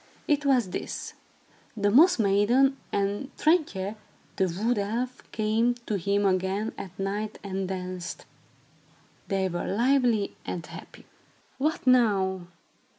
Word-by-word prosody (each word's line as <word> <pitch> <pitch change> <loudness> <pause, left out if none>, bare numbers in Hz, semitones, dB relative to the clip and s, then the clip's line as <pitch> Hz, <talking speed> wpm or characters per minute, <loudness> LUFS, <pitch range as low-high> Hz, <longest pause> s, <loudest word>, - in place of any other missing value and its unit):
It 290 -1 +1
was 245 -9 +3
this: - - -5 0.6
The 205 -1 +2
Moss 335 - +6
Maiden 230 +6 +3 0.2
and 200 +6 -1
Trintje, 255 - +1 0.4
the 190 - +2 0.2
wood 240 -2 +2
elf, 235 +5 -2
came 225 +3 +1
to 210 - -1
him 200 +2 +1
again 190 +3 0
at 185 -1 -9
night 205 +2 -3
and 195 -1 -3
danced. 185 -1 -5 1.0
They 195 -2 0
were 175 -1 -3
lively 240 -1 +2
and 170 -2 -5
happy. - - -12 0.5
"What 305 +2 -1
now?" 195 -8 +3
205 Hz, 120 wpm, -27 LUFS, 190-245 Hz, 1.0 s, Moss